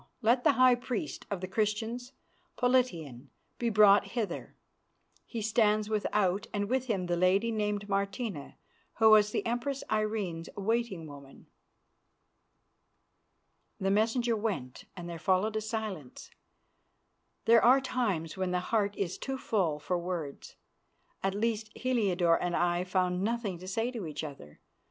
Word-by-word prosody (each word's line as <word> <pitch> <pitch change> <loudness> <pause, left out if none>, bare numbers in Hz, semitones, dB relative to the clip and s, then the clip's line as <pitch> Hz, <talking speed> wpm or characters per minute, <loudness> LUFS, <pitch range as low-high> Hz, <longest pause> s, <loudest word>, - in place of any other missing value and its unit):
Let 240 +3 +3
the 300 - +5
high 255 -1 +6
priest 245 -2 -4
of 195 -3 -3
the 185 - -3
Christians, 220 +5 -2 0.4
Politian, 170 - 0 0.3
be 235 - +1
brought 205 -2 +5
hither. 210 -7 -3 0.7
He 230 -3 -4
stands 215 -1 +2
without, 205 -2 0
and 205 -1 -1
with 260 +2 0
him 195 -6 -1
the 175 0 0
lady 190 +6 +2
named 210 -2 -1
Martina, 200 - -3 0.4
who 220 0 +6
was 210 -1 +6
the - - -2
Empress 245 +4 -2
Irene's 210 -6 -1
waiting 205 -4 -1
woman." 140 -2 -12 2.3
The 195 0 +1
messengers 225 +2 +1
went 190 - -4
and 175 -1 -6
there 170 -1 -6
followed 190 +4 +1
a 215 - 0
silence. 215 - -5 1.1
There 230 0 +6
are 255 +3 +7
times 210 -12 -2
when 190 -1 -1
the 180 0 0
heart 205 +1 0
is 185 -3 -2
too 270 0 -3
full 185 - 0
for 175 +4 -2
words; 170 -5 -5 0.7
at 195 0 -1
least, 220 0 -1
Heliodore 190 -9 +2
and 175 -1 -1
I 175 +1 +1
found 185 -1 0
nothing 215 -4 -2
to 185 - -10
say 225 +6 -1
to 225 -9 -5
each 155 - -5
other. 135 - -10
205 Hz, 140 wpm, -30 LUFS, 180-230 Hz, 2.3 s, are